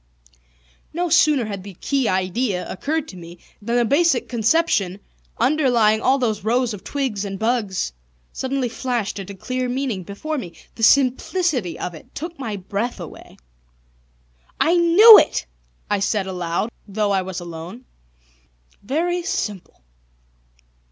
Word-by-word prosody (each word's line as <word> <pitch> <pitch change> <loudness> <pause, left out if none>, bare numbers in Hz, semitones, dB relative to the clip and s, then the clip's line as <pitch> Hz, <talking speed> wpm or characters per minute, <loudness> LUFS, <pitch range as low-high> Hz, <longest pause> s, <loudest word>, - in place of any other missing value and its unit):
No 350 +2 -1
sooner 300 -6 +4
had 200 -3 -6
the 200 -2 -10
key 270 +5 0
idea 185 +2 -1
occurred 310 +9 -3
to - - -10
me 175 0 -11 0.2
than 235 +3 -2
the 240 -1 +3
basic 290 +2 +2
conception 225 - +1 0.4
underlying 240 -5 +3
all 265 +2 +3
these 220 -7 -1
rows 240 +1 +1
of 200 - -9
twigs 260 -8 -2
and 195 -1 -5
bugs 215 - -1 0.4
suddenly 265 -1 -2
flashed 235 -4 -3
into 195 +1 -7
clear 255 +5 -3
meaning 250 -6 -2
before 275 - -5
me. 175 -8 -8 0.2
The - - -11
simplicity 260 - +2
of 180 - -5
it 160 - -14
took 330 +1 -6
my 225 -6 -4
breath 200 +4 -4
away. 170 -4 -11 1.2
"I 335 - +3
knew 355 +6 +9
it!" 65 - 0 0.4
I 205 - 0
said 200 0 0
aloud, 180 +3 -2 0.2
though 205 0 -1
I 195 -1 +2
was 185 0 -5
alone. 175 +8 -9 1.0
"Very 340 - -1
simple." 280 - -4
230 Hz, 140 wpm, -21 LUFS, 195-275 Hz, 1.2 s, knew